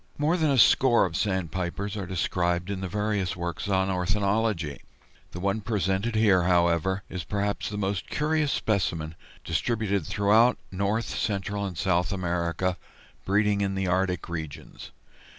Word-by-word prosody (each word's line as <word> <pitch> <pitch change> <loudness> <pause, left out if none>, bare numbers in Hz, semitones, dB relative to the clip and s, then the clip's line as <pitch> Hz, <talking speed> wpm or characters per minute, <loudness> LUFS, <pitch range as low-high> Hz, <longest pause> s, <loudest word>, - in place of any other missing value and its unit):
More 150 +4 +2
than 160 -4 +1
a 135 - +2
score 120 +1 +5
of - - -4
Sandpipers 95 0 -2
are 100 -4 -4
described 90 0 -1
in 95 -1 -4
the 95 - -3
various 105 -1 -1
works 85 +1 -4
on 95 -1 +1
ornithology. 100 -3 0 0.5
The 90 - -8
one 100 +3 0
presented 105 +1 -1
here, 105 -4 +4
however, 85 +2 +2
is 90 -2 -5
perhaps 100 +1 -2
the 105 - -5
most 100 -3 -2
curious 150 -1 +1
specimen, 85 -9 -1 0.3
distributed 100 +2 0
throughout 110 +5 +4
North, 100 +4 0
Central, 100 -1 -2
and 90 -4 -7
South 90 -2 +1
America, 90 -1 -1 0.5
breeding 105 +1 +2
in 95 -1 0
the 95 0 -1
Arctic 90 0 0
regions. 80 -4 -7
95 Hz, 145 wpm, -27 LUFS, 90-105 Hz, 0.5 s, score